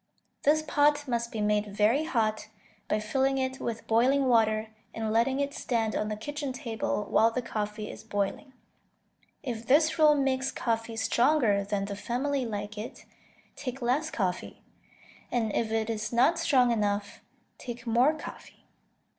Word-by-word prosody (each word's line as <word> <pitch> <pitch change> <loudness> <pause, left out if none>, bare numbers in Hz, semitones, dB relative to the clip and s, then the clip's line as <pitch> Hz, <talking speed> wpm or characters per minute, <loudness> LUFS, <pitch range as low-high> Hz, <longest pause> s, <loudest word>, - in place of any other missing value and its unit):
This 310 +2 +3
pot 295 -1 +2
must 235 -1 -1
be 220 - -3
made 210 0 +1
very 215 +9 +2
hot, 220 -7 0 0.4
by 215 - +1
filling 265 +5 0
it 260 0 -2
with 230 -1 -4
boiling 260 +5 +3
water 220 -2 +2 0.2
and 220 -1 -2
letting 255 +4 +2
it 280 0 -1
stand 225 -5 -1
on 210 - -1
the 215 - -2
kitchen 285 +5 -5
table 225 -4 -3
while 225 - +4
the 245 +2 -3
coffee 210 -1 -4
is - - -11
boiling. 205 +5 -3 0.9
If 235 -4 -5
this 310 +4 +4
rule 305 -1 +6
makes 265 -1 0
coffee 225 -1 -2
stronger 235 -3 +2
than 200 0 -2
the 200 0 -5
family 255 +5 -1
like 210 0 -5
it, 220 - -8 0.5
take 265 -1 -5
less 265 +6 0
coffee, 185 -9 -3 0.7
and 225 -4 0
if 225 - 0
it 220 -1 0
is 215 -2 -3
not 265 +8 +3
strong 260 -7 +3
enough, 205 -2 -1 0.4
take 240 0 -7
more 245 +6 +3
coffee. 310 - -11
235 Hz, 155 wpm, -28 LUFS, 215-270 Hz, 0.9 s, rule